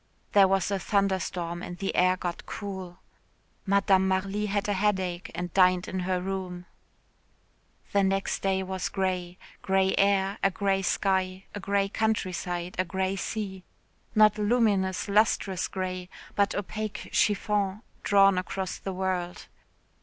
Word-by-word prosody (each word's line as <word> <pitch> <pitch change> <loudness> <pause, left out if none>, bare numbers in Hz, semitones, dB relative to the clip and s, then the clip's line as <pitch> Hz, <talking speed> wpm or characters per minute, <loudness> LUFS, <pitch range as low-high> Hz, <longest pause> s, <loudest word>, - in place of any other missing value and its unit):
There 200 -2 +6
was 195 0 +1
a 200 - 0
thunderstorm 185 -4 -1
and 175 -1 -7
the 195 +2 -2
air 185 +1 +4
got 175 -1 -5
cool. 190 -4 -6 0.7
Madame 195 -1 +4
Marly 195 +2 0
had 205 0 -1
a 205 - +1
headache 190 -3 0
and 175 0 -4
dined 185 -1 +4
in 190 - -3
her 180 0 0
room. 180 -1 -4 1.3
The 200 - +3
next 195 0 0
day 190 -1 +1
was 190 -1 -3
grey 185 -2 -2 0.2
grey 190 0 +2
air, 195 0 +2
a 195 - +4
grey 195 0 0
sky, 190 0 0
a 205 - -5
grey 200 0 +1
countryside, 185 -4 -2
a - - +4
grey 190 +1 -1
sea 195 -2 -4 0.5
not 215 0 +5
luminous, 205 -4 +2
lustrous 200 -2 +2
grey, 185 -1 -4 0.2
but 200 -1 +1
opaque 215 +1 -4
chiffon 205 0 +1 0.2
drawn 195 -2 +5
across 185 +1 -4
the 195 - -5
world. 180 -1 -2
190 Hz, 140 wpm, -27 LUFS, 185-200 Hz, 1.3 s, There